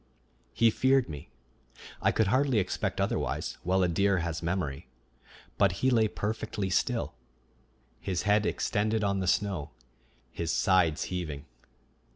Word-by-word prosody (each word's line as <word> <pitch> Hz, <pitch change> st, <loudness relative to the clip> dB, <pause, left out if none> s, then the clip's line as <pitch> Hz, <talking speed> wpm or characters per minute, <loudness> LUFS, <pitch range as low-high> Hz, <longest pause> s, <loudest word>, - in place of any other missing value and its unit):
He 115 Hz, -1 st, +3 dB
feared 130 Hz, -3 st, +2 dB
me 75 Hz, -3 st, -8 dB, 0.7 s
I -, -, +3 dB
could 110 Hz, -, +2 dB
hardly 130 Hz, +4 st, +2 dB
expect 95 Hz, -3 st, -1 dB
otherwise, -, -, -2 dB
while 95 Hz, +2 st, +1 dB
a -, -, +3 dB
deer 100 Hz, +3 st, +2 dB
has 85 Hz, -2 st, -3 dB
memory 85 Hz, -7 st, -3 dB, 0.7 s
but -, -, +4 dB
he 130 Hz, -, +1 dB
lay 115 Hz, -3 st, +4 dB
perfectly 105 Hz, -2 st, -3 dB
still, 115 Hz, -, 0 dB, 0.9 s
his 95 Hz, -2 st, -2 dB
head 105 Hz, 0 st, +3 dB
extended 110 Hz, 0 st, 0 dB
on 100 Hz, -1 st, +1 dB
the 95 Hz, -, -2 dB
snow, 95 Hz, -6 st, 0 dB, 0.6 s
his 85 Hz, -1 st, -3 dB
sides 90 Hz, -5 st, +2 dB
heaving. 75 Hz, -6 st, -4 dB
95 Hz, 135 wpm, -29 LUFS, 85-110 Hz, 0.9 s, but